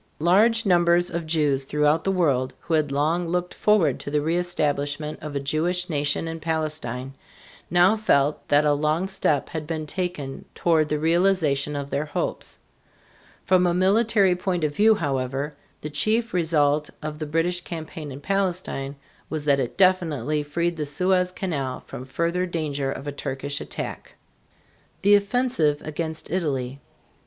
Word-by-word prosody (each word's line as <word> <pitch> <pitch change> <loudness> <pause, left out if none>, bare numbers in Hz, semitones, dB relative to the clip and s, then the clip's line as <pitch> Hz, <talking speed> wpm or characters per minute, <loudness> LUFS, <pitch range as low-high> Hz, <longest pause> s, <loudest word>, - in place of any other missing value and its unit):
Large 215 +8 +3
numbers 175 -1 +3
of 170 -1 -3
Jews 150 -4 +1
throughout 150 +3 +1
the 195 - +2
world, 135 -8 +1
who 170 - -4
had 155 -3 +2
long 160 +5 +1
looked 180 +1 -2
forward 195 -10 +2
to - - -6
the 150 - 0
reëstablishment 150 -2 -1
of 150 -2 -6
a - - +1
Jewish 170 +6 -1
nation 145 +2 0
in 165 0 -5
Palestine, 155 -6 -3 0.6
now 175 +5 +5
felt 150 -10 +1
that 145 +1 +4
a 145 - +4
long 155 +5 0
step 150 -7 0
had 160 -3 -5
been 160 -1 -3
taken 150 -5 -4
toward 160 -3 +2
the 150 - +1
realization 160 -3 +2
of 140 0 -5
their 145 - -1
hopes. 145 - -3 0.9
From 180 -1 +4
a 175 - +1
military 195 0 +3
point 180 -2 -2
of 150 -1 0
view, 220 +1 +5
however, 140 -2 -2 0.3
the 150 - -5
chief 225 +9 +1
result 150 -4 +2
of 155 0 -5
the 155 - -4
British 165 +3 0
campaign 160 -3 -7
in 135 +2 -8
Palestine 180 -7 -2 0.3
was 155 -2 -4
that 140 -2 +3
it 125 -3 -3
definitely 155 -7 +2
freed 170 +3 -2
the 150 - -2
Suez 180 +4 +1
Canal 145 -9 -3
from 130 - -8
further 170 +6 -1
danger 145 -5 -2
of 135 +1 -7
a - - -1
Turkish 140 0 -4
attack. - - -6 0.9
THE 205 +1 +6
OFFENSIVE 200 - +1
AGAINST 160 +1 -5
ITALY. 140 -7 -2
155 Hz, 155 wpm, -24 LUFS, 145-180 Hz, 0.9 s, THE